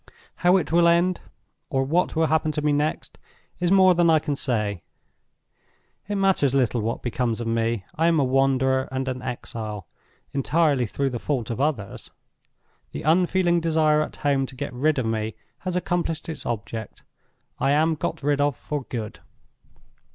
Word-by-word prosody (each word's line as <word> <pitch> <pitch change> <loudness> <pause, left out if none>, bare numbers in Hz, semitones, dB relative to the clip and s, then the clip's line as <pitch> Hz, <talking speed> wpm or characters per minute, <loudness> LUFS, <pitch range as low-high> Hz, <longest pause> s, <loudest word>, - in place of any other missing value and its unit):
How 180 +2 +4
it 180 - -2
will 170 0 +5
end, 170 +2 +2 0.5
or 135 -3 +1
what 170 +8 0
will 160 0 +3
happen 155 0 +1
to 150 - -2
me 150 -1 +2
next, 150 +2 -2 0.4
is 175 0 +1
more 190 -1 +6
than 170 -1 +3
I 160 - +6
can 150 -1 -2
say. 105 -9 -1 1.3
It 205 - -1
matters 190 -9 +2
little 125 -3 +1
what 115 +2 -3
becomes 120 -1 -1
of 120 - -3
me. 115 -3 -1
I 165 +1 +1
am 165 -2 +3
a - - +3
wanderer 130 0 +2
and 130 0 -3
an 130 -1 -3
exile, 110 -5 -5 0.5
entirely 140 -2 +1
through 135 +5 -1
the 120 - -4
fault 125 -4 -2
of 115 - -3
others. 140 -10 -2 0.8
The - - -5
unfeeling 175 +2 +3
desire 155 -2 +2
at - - -4
home 140 -2 0
to 130 - -11
get 125 - -5
rid 145 +5 +1
of 130 - 0
me 110 -1 -2 0.2
has 180 -1 -4
accomplished 175 -3 -2
its 160 - -5
object. 110 -1 -5 0.6
I - - +1
am 155 +3 +3
got 150 - -4
rid 145 0 +1
of 145 -3 +1
for 145 -4 -4
good. 110 -7 -6
140 Hz, 175 wpm, -24 LUFS, 125-165 Hz, 1.3 s, more